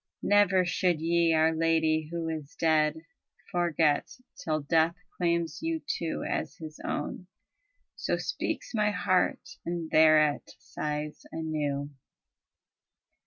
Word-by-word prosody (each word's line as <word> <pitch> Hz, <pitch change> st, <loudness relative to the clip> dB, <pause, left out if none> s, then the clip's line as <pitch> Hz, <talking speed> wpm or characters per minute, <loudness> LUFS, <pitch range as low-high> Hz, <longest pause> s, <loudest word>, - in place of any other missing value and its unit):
Never 200 Hz, -3 st, +4 dB
should 175 Hz, -2 st, +1 dB
ye 170 Hz, +1 st, +2 dB
our 160 Hz, +1 st, +4 dB
Lady 160 Hz, -1 st, +1 dB
who 170 Hz, -1 st, -3 dB
is 155 Hz, -1 st, -5 dB
dead 155 Hz, -1 st, +2 dB, 0.5 s
Forget, 165 Hz, -4 st, +2 dB, 0.3 s
till 155 Hz, -1 st, 0 dB
death 160 Hz, +3 st, +2 dB, 0.2 s
claims 170 Hz, -2 st, 0 dB
you 325 Hz, 0 st, -1 dB
too 170 Hz, -, -3 dB
as -, -, -3 dB
his 155 Hz, -1 st, -10 dB
own." 180 Hz, +4 st, -4 dB, 0.7 s
So -, -, -1 dB
speaks -, -, -3 dB
my 210 Hz, -2 st, +2 dB
heart, 185 Hz, -2 st, 0 dB
and 170 Hz, -2 st, -4 dB
thereat 155 Hz, -2 st, +4 dB
sighs 150 Hz, 0 st, -5 dB
anew. 150 Hz, -3 st, -2 dB
160 Hz, 115 wpm, -29 LUFS, 155-170 Hz, 0.7 s, Never